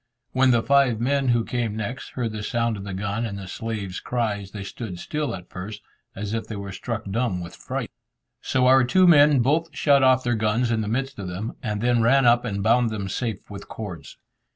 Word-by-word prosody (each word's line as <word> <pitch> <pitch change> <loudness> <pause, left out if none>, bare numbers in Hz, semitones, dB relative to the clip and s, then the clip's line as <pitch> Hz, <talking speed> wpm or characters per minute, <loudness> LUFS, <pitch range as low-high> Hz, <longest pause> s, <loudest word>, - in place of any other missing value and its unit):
When 130 0 +3
the 120 -2 +3
five 135 -5 +3
men 135 +3 +1
who 120 -2 +2
came 120 -4 -2
next, 110 +4 -5
heard 120 -3 -2
the 105 0 -5
sound 115 +1 0
of 100 - -7
the 100 - -5
gun 100 +3 -2
and 105 -4 -4
the 95 -1 -8
slave's 100 -2 -4
cries, 105 -5 -2
they 100 0 -7
stood 100 -1 -6
still 150 +6 -3
at 90 -1 -12
first, 100 +3 -7 0.3
as 105 +2 -4
if 115 - -3
they 110 - -5
were 100 0 -6
struck 115 +4 -4
dumb 115 -4 0
with 85 -1 -8
fright. - - -5 0.5
So 130 -1 +1
our 130 +1 +6
two 185 +9 +4
men 145 -5 +6
both 155 +6 +1
shot 140 -2 +4
off 130 -1 +4
their 120 - +1
guns 110 +2 +1
in 110 -1 +1
the 105 - -3
midst 135 +3 -2
of 95 - -5
them, 95 +5 -5
and 105 -3 -3
then 120 -1 +2
ran 135 +4 +4
up 120 +1 +4
and 100 -4 -2
bound 115 +2 +3
them 100 -3 -4
safe 115 0 -3
with 100 0 -8
cords. 95 -9 -8
115 Hz, 225 wpm, -24 LUFS, 100-125 Hz, 0.5 s, our